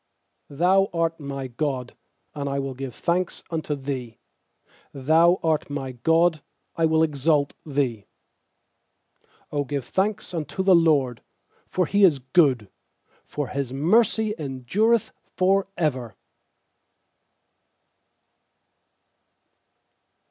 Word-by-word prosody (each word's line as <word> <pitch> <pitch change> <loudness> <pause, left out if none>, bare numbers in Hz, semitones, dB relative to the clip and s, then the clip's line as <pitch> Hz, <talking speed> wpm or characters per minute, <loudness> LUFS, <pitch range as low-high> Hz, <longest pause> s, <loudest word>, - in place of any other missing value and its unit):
28Thou 185 +6 +3
art 165 0 0
my 140 -2 -5
God, 130 -1 -3 0.4
and 140 -2 -4
I 140 - -2
will 135 -1 -3
give 130 -1 -7
thanks 175 +1 -1
unto 155 -2 -2
Thee; 130 -5 -5 0.8
Thou 160 +6 +3
art 160 -3 0
my 140 -2 -4
God, 160 +5 +2 0.3
I 165 -1 +2
will 160 0 +3
exalt 145 -1 +1
Thee. 130 -8 -1 1.5
29Q 145 -2 -1
give 140 -3 -3
thanks 200 - -1
unto 165 +3 -3
the 190 0 +5
LORD, 150 -8 +3 0.5
for 180 - 0
He 200 +4 +2
is 170 -7 +6
good, 130 - +2 0.5
For 145 -2 -4
His 140 -3 -3
mercy 215 - +2
endureth 160 - 0 0.2
for 190 +1 +2
ever. 130 -9 -1
150 Hz, 105 wpm, -24 LUFS, 135-175 Hz, 1.5 s, is